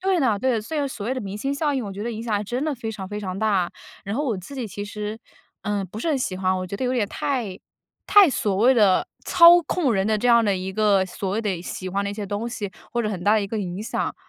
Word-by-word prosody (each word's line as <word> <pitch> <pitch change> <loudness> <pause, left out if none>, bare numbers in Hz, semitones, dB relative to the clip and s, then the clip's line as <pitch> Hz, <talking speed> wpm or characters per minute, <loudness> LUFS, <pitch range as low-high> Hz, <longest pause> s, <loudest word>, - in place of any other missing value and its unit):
对 375 -2 +1
的， 225 -6 +2
对。 245 -2 +1
虽 305 +9 -5
然 285 - 0
所 215 -5 -6
谓 260 - 0
的 255 - -3
明 195 -1 -5
星 275 +5 -1
效 295 0 0
应， 255 -4 -1
我 200 - -5
觉 200 +2 -6
得 235 - -2
影 220 - -5
响 225 -3 -1
还 205 - -2
真 245 +6 -3
的 305 -3 -1
非 225 -2 -5
常 195 -3 -7
非 210 +1 -4
常 190 -1 -4
大。 200 -5 +1 0.3
然 200 +2 -3
后 295 - 0
我 230 -6 0
自 200 +10 -10
己 250 -4 -3
其 205 +1 -6
实， 210 +1 -5 0.4
嗯， 205 -2 -2
不 210 - -8
是 330 - -1
很 290 -4 +1
喜 190 -7 -2
欢， 185 0 +1
我 185 0 -3
觉 200 - -5
得 260 - -3
有 250 - 0
点 230 -5 +1
太 225 -8 -2 0.5
太 405 -5 +7
所 205 -6 0
谓 250 +6 +5
的 205 -5 +4 0.2
操 345 0 +8
控 300 -10 +1
人 195 0 +1
的 215 -1 +1
这 245 - +1
样 235 -1 +6
的 200 -2 +2
一 185 +1 -4
个 200 -2 +3
所 190 +1 -4
谓 210 +4 0
的 185 -5 -2
喜 185 0 -5
欢 200 +2 -1
的 200 - -2
一 - - -5
些 205 -1 -5
东 210 +4 -3
西， 210 -4 -5 0.2
或 240 0 0
者 215 - -1
很 180 -4 -4
大 210 +2 +5
的 215 - +3
一 - - -3
个 220 +2 -3
影 185 0 -4
响。 - - -2
215 Hz, 320 characters per minute, -23 LUFS, 200-245 Hz, 0.5 s, 操